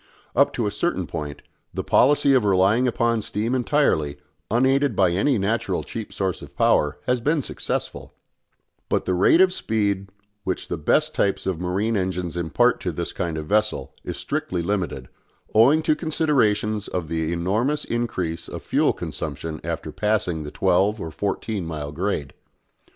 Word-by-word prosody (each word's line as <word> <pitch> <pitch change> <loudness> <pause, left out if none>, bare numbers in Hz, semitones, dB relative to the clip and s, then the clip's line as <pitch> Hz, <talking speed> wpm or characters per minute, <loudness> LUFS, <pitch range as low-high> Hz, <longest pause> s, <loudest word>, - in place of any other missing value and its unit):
Up - - +4
to 115 - -1
a 105 - 0
certain 105 - -1
point, 75 -3 -6 0.3
the - - -2
policy 140 +1 +4
of 130 -4 +4
relying 100 +5 +3
upon 115 -1 +1
steam 105 +4 -2
entirely, 125 - +1 0.3
unaided 135 +5 +2
by 95 -3 +3
any 115 +9 +2
natural 105 +4 -1
cheap 110 -2 -6
source 95 -2 -2
of - - -12
power, 75 0 +3
has 125 0 +1
been 150 +3 +1
successful; - - -4 0.7
but - - 0
the 95 - 0
rate 95 - +5
of 185 -1 +5
speed 100 - -1 0.3
which 95 -1 -3
the 85 - -2
best 155 - +2
types 100 - 0
of 95 -4 -1
marine 95 +6 0
engines 90 -3 -2
impart 80 -4 +2
to - - -2
this - - -4
kind 85 -2 -2
of 75 - -4
vessel 105 -8 0
is - - -5
strictly 90 -2 -2
limited, 95 -1 -2 0.5
owing 135 +9 +5
to 155 - +3
considerations 120 - +1
of 90 -3 -3
the 80 0 -1
enormous 105 - 0
increase 90 -9 -2
of - - -7
fuel - - +2
consumption 80 -1 -5
after 80 -1 -4
passing 105 -6 0
the 75 - -6
twelve 95 +6 +2
or 80 -4 -5
fourteen 100 +3 -2
mile 75 -3 -5
grade. 75 -4 -2
100 Hz, 160 wpm, -23 LUFS, 85-120 Hz, 0.7 s, rate